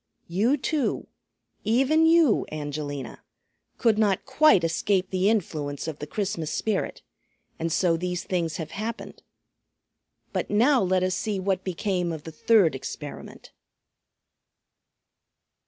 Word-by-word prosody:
You 215 +11 +2
too, 290 0 -1 0.6
even 270 +9 +3
you, 325 -7 +4
Angelina, 145 -2 -5 0.6
could 225 -3 +2
not 200 -3 +2
quite 270 - +4
escape 185 +3 0
the 190 +1 +2
influence 155 -9 -2
of 155 -2 -5
the 145 - -6
Christmas 195 -4 -3
Spirit, 220 - -2 0.6
and 165 0 -2
so 170 0 +2
these 180 0 -3
things 170 -4 -2
have 160 -2 -6
happened. 220 +3 -6 1.1
But - - -2
now 250 +6 +4
let 185 -1 +1
us 185 0 +1
see 205 0 -2
what 190 0 -1
became 180 -1 -1
of 155 -2 -6
the 160 - -8
third 215 - +3
experiment." 140 +2 -8
185 Hz, 120 wpm, -26 LUFS, 165-220 Hz, 1.1 s, you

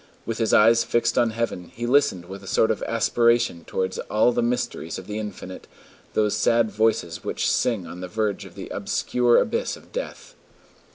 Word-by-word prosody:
With 115 0 -4
his 110 -2 +1
eyes 115 +2 +6
fixed 115 0 +1
on 120 -2 +3
heaven, 115 -5 -3
he 120 - -4
listened 125 -8 +2
with 95 +2 -9
a - - -11
sort 110 - +2
of - - -3
aspiration 115 -4 +2
towards 95 0 -2
all 110 +3 +3
the 120 - 0
mysteries 120 -8 -2
of 95 - -8
the 105 +2 -4
infinite, 100 -3 -8 0.5
those 105 -1 +2
sad 115 +1 +2
voices 105 -6 0
which - - -2
sing 110 -7 +1
on 90 +1 -9
the 90 - -5
verge 105 0 -2
of - - -13
the - - -8
obscure 120 -1 +1
abyss 470 +2 0
of - - -19
death. - - -6
110 Hz, 185 wpm, -24 LUFS, 95-120 Hz, 0.5 s, eyes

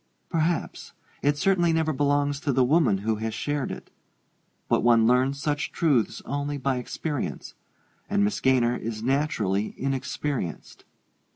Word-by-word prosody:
"Perhaps 165 0 -1 0.3
it 145 +1 +2
certainly 175 0 +2
never 160 -1 +1
belongs 145 0 +1
to 145 - -1
the 130 0 +3
woman 130 -6 +3
who 110 +2 -1
has 110 0 -3
shared 145 -2 -2
it. - - -9 0.8
But - - +2
one 115 -1 +5
learns 130 +3 +2
such 145 0 -1
truths 140 -9 +1
only 145 +1 -2
by 135 -1 0
experience; 145 +3 -4 0.6
and 205 +1 +2
Miss 205 -1 0
Gaynor 125 -2 +2
is 110 -1 -5
naturally 115 -7 0
inexperienced." 135 - -3
140 Hz, 135 wpm, -26 LUFS, 120-150 Hz, 0.8 s, one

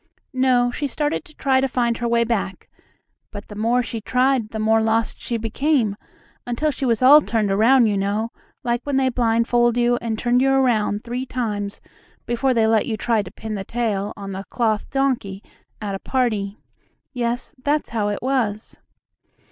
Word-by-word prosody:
No, 255 -2 +3
she 285 +3 -3
started 295 +3 -2
to 305 - -18
try 265 -1 +2
to 270 - +1
find 240 -2 0
her 240 - -1
way 235 0 +3
back, 220 -5 -3 0.6
but 205 -1 -9
the 210 - -9
more 235 +4 +1
she 230 -1 -5
tried 255 -1 +1
the 220 - -6
more 220 +1 +3
lost 225 +1 0
she 235 - -2
became, 230 0 0 0.5
until 245 +6 -1
she 275 - -4
was 230 +1 +1
all 290 +4 +9
turned 220 -7 0
around, 235 +5 +5
you 210 -2 +1
know, 205 +4 -1 0.3
like 240 0 -1
when 285 -2 -1
they 265 -1 +3
blindfold 240 0 +2
you 240 0 +3
and 225 -2 -2
turn 240 +2 +2
you 270 +1 +3
around 235 -6 +2
three 245 +2 -4
times 210 -5 -3 0.4
before 245 +2 0
they 225 -1 +3
let 220 -1 +2
you 220 - -2
try 225 -1 +1
to 190 - -8
pin 220 +2 -7
the 200 -2 -3
tail 210 -3 -2
on 200 -1 -6
the 195 0 -5
cloth 220 -3 -1
donkey 250 -8 -1 0.4
at 205 -2 -4
a 195 - -4
party. 215 -6 -1 0.6
Yes, 240 0 -2
that's 295 +1 0
how 215 -3 0
it 205 +2 -3
was. 240 -5 -1
235 Hz, 185 wpm, -22 LUFS, 215-255 Hz, 0.6 s, all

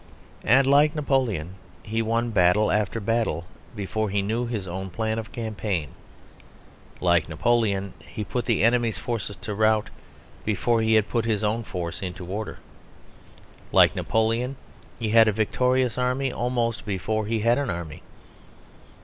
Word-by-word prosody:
And, 130 +3 +5
like 145 +3 +4
Napoleon, 125 - 0 0.3
he 110 +1 -1
won 115 +1 0
battle 100 +1 +4
after 105 +1 0
battle 110 -6 -1 0.3
before 105 +1 -2
he 100 0 0
knew 115 +4 -1
his 105 -5 -4
own 95 +2 -5
plan 110 +4 -2
of 110 -2 -8
campaign; 105 - -3 1.1
like 85 -3 +2
Napoleon, 100 +2 +1
he 85 +5 -5
put 120 +4 -3
the 115 -4 +1
enemies' 120 -1 +2
forces 115 -4 -3
to 115 -3 -6
rout 110 0 +2 0.5
before 110 +3 +1
he 110 0 +3
had 110 -1 +3
put 115 -2 -1
his 110 -2 0
own 110 +2 0
force 85 -7 -5
into 90 -1 -5
order. 105 +4 -5 1.1
Like - - +5
Napoleon, 115 +4 0 0.4
he 115 -2 -2
had 115 0 +6
a - - +4
victorious 125 +4 +1
army 125 +1 0
almost 120 -2 -1
before 105 +1 -2
he 110 0 0
had 120 +4 +3
an 140 - -2
army. 85 -4 -5
110 Hz, 150 wpm, -25 LUFS, 100-120 Hz, 1.1 s, had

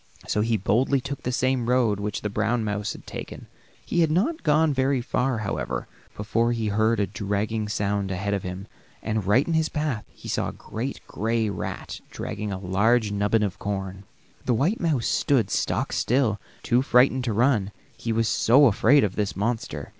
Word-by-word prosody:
So 105 - +1
he 115 +1 +1
boldly 120 +8 +2
took 140 +1 -6
the 125 - -2
same 125 -1 0
road 120 -5 +2
which 105 0 -3
the 105 - -2
brown 110 +2 0
mouse 105 -1 -2
had - - -13
taken. - - -8 0.4
He 175 - -1
had 160 - +3
not 225 - +1
gone 155 -1 +3
very 135 0 +1
far, 125 +1 0
however, 105 -3 -3 0.3
before 115 +3 +1
he 110 -2 -1
heard 110 +2 +2
a 100 - +2
dragging 105 +2 -2
sound 100 -2 -1
ahead 95 +2 -2
of 100 - 0
him, 90 +2 -6 0.4
and 110 -2 -1
right 120 +8 +4
in 170 - 0
his 160 -1 +2
path 150 -8 -2
he - - -13
saw - - -1
a - - -8
great 125 +5 -5
gray 110 0 -1
rat - - -5
dragging 105 0 -5
a 95 - -3
large 105 +4 +2
nubbin 105 +2 +1
of 100 -3 -3
corn. 95 -1 -4 0.4
The 125 - +1
white 165 - +1
mouse 150 -9 +1
stood 115 -9 +2
stock - - -1
still, 120 -4 +1 0.2
too 120 +1 +3
frightened 130 0 +4
to 115 - 0
run; 110 -3 +2 0.2
he 115 - -4
was 115 0 +1
so 130 +7 +5
afraid 130 +4 +5
of 100 -3 -1
this 105 -2 -1
monster. 115 +3 -3
115 Hz, 190 wpm, -25 LUFS, 105-130 Hz, 0.4 s, so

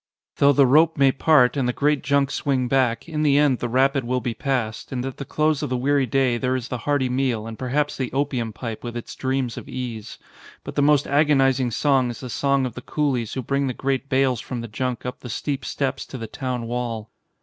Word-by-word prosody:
Though 140 - +5
the 140 0 +5
rope 155 +5 +4
may 135 -1 +5
part 135 -2 +4
and 130 -3 0
the - - 0
great 145 +1 +1
junk 140 0 +1
swing 130 -3 0
back, 125 -2 +1
in 155 -2 -3
the 145 -2 +4
end 145 -4 +3
the 120 - -2
rapid 135 +2 +2
will 125 +2 -1
be 120 0 -3
passed; 115 -3 -2
and 125 -1 -3
at 135 - -5
the 140 - -6
close 155 0 +1
of - - -2
the 125 - 0
weary 135 +1 +1
day 125 0 +1
there 130 +1 0
is 125 -2 -4
the 125 - -3
hearty 145 -3 +2
meal 125 -4 -1
and 115 -1 -8
perhaps 145 +3 -1
the 130 -3 -3
opium 135 -4 -1
pipe 115 0 -6
with 120 0 -5
its 120 - -7
dreams 130 -2 -2
of - - -8
ease. 120 -4 -6 0.5
But - - -7
the - - +1
most 145 0 +4
agonising 135 -3 +3
song 130 +1 +2
is 120 - -7
the 125 -2 -6
song 140 +2 +1
of 125 - -4
the 125 - -8
coolies 130 -6 -1
who 130 - -3
bring 140 +3 0
the 130 - -3
great 135 0 -2
bales 130 -3 +2
from 125 -2 -5
the 115 - -6
junk 125 +3 -3
up 125 0 -5
the 125 - -9
steep 140 +4 -3
steps 135 -1 -2
to 130 - -7
the 115 - -5
town 125 0 -4
wall. 115 -2 -4
130 Hz, 240 wpm, -23 LUFS, 125-140 Hz, 0.5 s, Though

